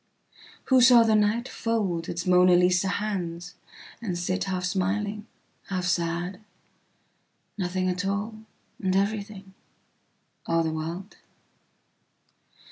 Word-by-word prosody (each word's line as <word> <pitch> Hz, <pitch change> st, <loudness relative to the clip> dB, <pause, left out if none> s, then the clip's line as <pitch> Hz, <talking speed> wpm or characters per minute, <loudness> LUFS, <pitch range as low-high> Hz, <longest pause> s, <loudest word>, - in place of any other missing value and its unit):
Who 260 Hz, -1 st, +6 dB
saw 240 Hz, -1 st, +8 dB
the 225 Hz, -1 st, +2 dB
nightfold 210 Hz, -4 st, 0 dB
its 170 Hz, 0 st, -4 dB
Mona 180 Hz, 0 st, +5 dB
Lisa 180 Hz, +1 st, +3 dB
handsand 180 Hz, -4 st, -3 dB, 0.6 s
sit 185 Hz, +2 st, -2 dB
half 185 Hz, -2 st, -2 dB
smiling, 205 Hz, +4 st, -2 dB, 0.4 s
half 185 Hz, -2 st, -2 dB
sad, 175 Hz, +2 st, -1 dB, 1.2 s
nothing 185 Hz, -1 st, -1 dB
at 180 Hz, +1 st, -1 dB
all, 205 Hz, +3 st, -3 dB, 0.4 s
and 190 Hz, -2 st, 0 dB
everything, 200 Hz, -1 st, -2 dB, 0.9 s
all 165 Hz, 0 st, +2 dB
the 160 Hz, -, -1 dB
world 170 Hz, +6 st, -6 dB
190 Hz, 100 wpm, -26 LUFS, 175-210 Hz, 1.2 s, saw